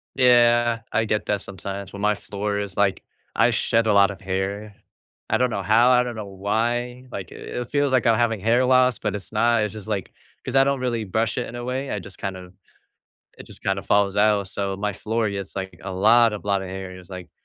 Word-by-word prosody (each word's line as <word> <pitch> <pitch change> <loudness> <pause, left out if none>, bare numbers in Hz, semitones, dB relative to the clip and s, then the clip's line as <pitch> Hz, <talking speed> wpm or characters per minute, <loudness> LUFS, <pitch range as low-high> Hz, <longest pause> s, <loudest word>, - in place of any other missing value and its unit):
Yeah, 120 -2 +4
I 110 - +2
get 105 -1 -1
that 105 -1 0
sometimes, 100 +1 -7
when 100 - -7
my 105 0 +3
floor 105 0 -4
is 100 -2 -5
like 100 -2 +1 0.3
I - - +4
shed 115 0 +1
a 105 - +3
lot 100 0 +5
of 100 - -9
hair. 100 +2 -3 0.6
I - - +3
don't 125 - +2
know 100 -5 -3
how, 115 +5 +4
I 125 -1 +5
don't 120 -2 -5
know 105 -2 -5
why, 120 +6 -2
like 95 -7 -7
i - - -10
it 120 -1 -6
feels 145 -1 +1
like 130 -2 +2
I'm 115 -1 +5
having 115 -3 +1
hair 115 +5 +3
loss, 130 -2 +4
but - - -2
it's 100 - -10
not, 115 +1 +3
it's 105 - -2
just, 110 -1 -8
like 100 -4 -3 0.3
'cause 130 - -3
I 135 - +6
don't 140 -1 0
really 120 -3 -1
brush 110 +3 -1
it 125 - -3
in - - -9
a 120 - -5
way, 130 +2 -3
I - - -2
just, 100 0 -10
kind 95 -1 -4
of 90 -1 -11 0.9
it - - -11
just, - - -12
kind 95 0 0
of, - - -8
falls 100 -1 +2
out, 105 -1 +3
so 100 0 -3
my 105 +1 -2
floor 110 +2 -1
gets 100 -1 -6
like 95 -3 -6
a 95 - -5
lot 110 +4 +4
of 105 - -8
lot 100 -1 +1
of 95 - -7
hair, 95 0 -6
it's 90 -2 -14
like, 90 -3 -8
105 Hz, 245 wpm, -23 LUFS, 100-120 Hz, 0.9 s, I